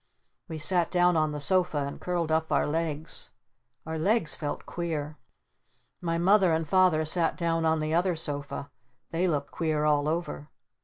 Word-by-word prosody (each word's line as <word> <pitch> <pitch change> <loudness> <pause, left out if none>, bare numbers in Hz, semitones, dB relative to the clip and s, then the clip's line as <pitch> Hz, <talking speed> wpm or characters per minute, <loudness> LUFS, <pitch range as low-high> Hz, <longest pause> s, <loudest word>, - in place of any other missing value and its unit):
We 160 - -6
sat 170 +2 +2
down 180 -1 +3
on 155 -1 +2
the 150 - -4
sofa 175 -3 +2
and 140 - -7
curled 175 -3 -1
up 160 0 0
our - - +2
legs. 160 0 -3 0.6
Our 160 0 -4
legs 170 -4 +2
felt 145 +1 -4
queer. 155 -3 -4 0.8
My 165 -1 -1
Mother 185 0 +4
and 160 0 -1
Father 180 -2 +3
sat 165 +1 +2
down 165 -1 0
on 160 0 +2
the 155 +1 -2
other 175 +1 +2
sofa. 145 -2 -4 0.4
They 170 +3 +1
looked 145 -4 -2
queer 155 -2 -1
all 150 -1 +2
over. 155 - -3
160 Hz, 165 wpm, -28 LUFS, 150-175 Hz, 0.8 s, Mother